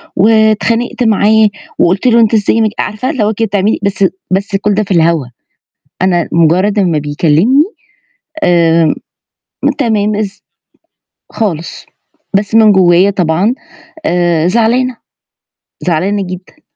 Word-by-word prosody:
واتخانقت 220 +4 +1
معاه 220 0 +3 0.3
وقُلت 190 +8 +1
له 235 -1 +4
أنت 225 0 +2
إزاي 220 +1 +2
ما 220 - +2
ج - - -5
عارفة 235 +5 -3
اللي 265 -9 -1
هو 215 +1 0
كده 225 +2 -1
بتعملي 200 +2 0
بس 200 -1 0 0.3
بس 195 +1 -1
كُلّ 205 +1 0
ده 215 +2 0
في 195 - -9
الهوا، 165 -4 +2 0.8
أنا 175 -3 +1
مُجرّد 180 +6 +2
أمّا 175 -6 +1
بيكلّمني، 160 - +2 0.8
آمم، 165 -2 +3 0.9
تمام 215 -5 0
إز 210 -1 -5 0.9
خالص، 170 -7 -4 0.5
بس 205 +1 -2
من 220 -2 +6
جوّايا 185 +1 +4
طبعًا 185 +5 0 0.5
آآ، 175 -2 +1
زعلانة، 235 +4 +1 0.8
زعلانة 185 +4 -1
جدًا. 185 - -10
200 Hz, 125 wpm, -12 LUFS, 175-220 Hz, 0.9 s, من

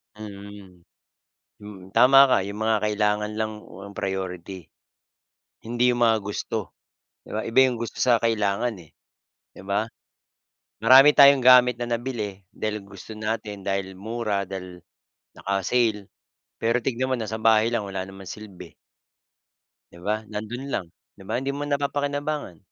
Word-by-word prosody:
Mm. 100 -3 -11 0.8
Mm, 95 -3 -11
tama 135 +2 +7
ka, 110 - +3
'yong 100 +1 -6
mga 110 0 +2
kailangan 105 0 0
lang 110 -1 -3
o 95 +3 -11
ang 100 - -12
priority. 95 -2 -5 1.0
Hindi 120 +2 +1
'yong 120 0 -2
mga 115 -1 +4
gusto, 105 0 -4 0.5
'di - - -14
ba, 110 - -1
iba 115 +3 -1
'yong 125 -2 -2
gusto 115 0 -6
sa 125 -2 +4
kailangan, 110 +1 0
eh. 80 - -19 0.6
'Di - - -14
ba? 105 +3 -1 0.9
Marami 135 +3 +8
tayong 140 -1 +7
gamit 125 -1 +7
na 120 - -3
nabili 115 -5 -4
dahil 105 -1 -4
gusto 100 +2 -11
natin, 105 -2 -4
dahil 95 -1 -2
mura, 110 -2 -2
dahil 90 -2 -8 0.6
naka-sale, 105 +1 0 0.5
pero 115 +2 +1
tingnan 130 +1 -2
mo - - +1
nasa 110 -1 -4
bahay 110 0 +4
lang, 110 -3 -1
wala 95 -1 -4
namang 95 -1 -11
silbi. 95 -4 -10 1.2
'Di 85 - -15
ba, 105 +1 +1
nando'n 110 +5 -6
lang. 100 -9 -3 0.3
'Di 95 - -15
ba, - - -1
hindi 135 +1 -2
mo 145 - -4
napapakinabangan. 145 - -2
110 Hz, 145 wpm, -24 LUFS, 100-120 Hz, 1.2 s, Marami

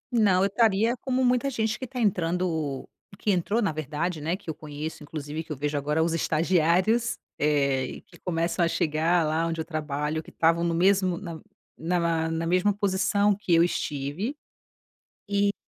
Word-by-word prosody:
Não, 195 -5 +4
eu - - +4
estaria 220 +2 +2
como 260 +1 0
muita 250 +2 +2
gente 220 -3 -1
que 260 - -4
está 255 0 -6
entrando 170 - 0 0.3
que 210 - 0
entrou, 200 +5 +1
na 200 - +1
verdade, 155 +2 -3
né, 165 +4 -1
que 200 - -24
eu 160 - -2
conheço, 155 +1 -7
inclusive 150 +1 -5
que 160 - -12
eu 150 - -3
vejo 145 +2 -2
agora 150 +3 +1
os 165 0 0
estagiários, 175 +8 +2 0.2
eh, 140 -3 +2
e - - -8
que 175 - -20
começam 170 0 0
a - - +4
chegar, 165 +1 +1
lá 160 +2 0
onde 165 0 -3
eu 160 - -2
trabalho, 155 -1 -2
que - - -14
estavam 165 +1 +2
no 170 -1 +1
mesmo 185 0 +3
na 170 -4 -7 0.4
na 175 +3 -1
ma 165 -1 0
na 165 0 -2
mesma 180 +4 +3
posição 200 0 +2
que 190 -4 +1
eu 165 - +6
estive. 160 - -2 0.9
E, 200 0 +2
170 Hz, 185 wpm, -26 LUFS, 155-200 Hz, 0.9 s, eu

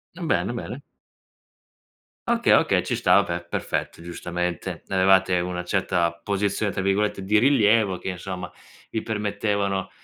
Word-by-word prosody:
Bene, 165 -8 -1
bene. 120 +3 -6 1.5
Okay - - +3
okay, - - +3
ci - - -1
sta, - - +5
vabbè, 85 0 -4
perfetto, 85 - -3
giustamente, 85 0 -4
avevate 95 -1 +4
una 90 0 -3
certa 90 -2 0
"posizione" 100 +1 -1
tra 95 - -2
virgolette 100 0 0
di 105 +3 +3
rilievo 110 -7 +3
che, - - -5
insomma, 90 0 -6 0.4
vi 110 - -2
permettevano 100 -2 -1
95 Hz, 125 wpm, -24 LUFS, 90-105 Hz, 1.5 s, sta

